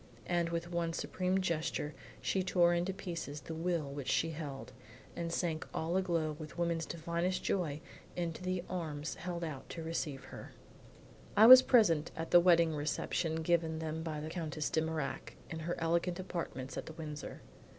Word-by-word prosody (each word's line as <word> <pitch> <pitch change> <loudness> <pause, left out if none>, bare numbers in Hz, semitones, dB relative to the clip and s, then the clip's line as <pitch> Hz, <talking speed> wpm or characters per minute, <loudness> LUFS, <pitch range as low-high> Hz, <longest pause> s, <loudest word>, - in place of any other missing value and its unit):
And 170 -1 +1
with 170 +1 -3
one 170 -1 -1
supreme 185 +2 0
gesture 160 -3 -1 0.3
she 190 - +1
tore 175 -1 +4
into 175 +2 0
pieces 170 -6 -5
the 160 - -7
will 165 -2 -1
which 140 -1 -6
she 165 +3 +2
held, 145 -4 -6 0.4
and 170 -1 -3
sank 165 -2 -1
all 165 +2 -1
aglow 170 -5 +1
with 155 +2 -8
woman's 170 -2 0
divinest 170 +2 -2
joy 155 -6 -1 0.3
into 170 -1 -3
the 185 -1 -1
arms 155 -4 -3
held 175 0 -5
out 150 -5 -6
to 165 - -6
receive 150 -4 -3
her. - - -10 0.8
I 215 - +9
was 255 +2 +13
present 185 - +4
at 165 0 -5
the 175 - +9
wedding 170 -2 +5
reception 160 +2 -1
given 165 -1 +1
them 160 0 -3
by 160 -2 -3
the 155 +1 -5
Countess 155 -3 -3
De 160 - +2
Mirac 160 -2 -3 0.2
in 160 - -4
her 170 +2 -2
elegant 170 +2 0
apartments 135 -8 -5
at - - -8
the 160 - -7
Windsor. 150 -2 -7
165 Hz, 170 wpm, -34 LUFS, 155-175 Hz, 0.8 s, was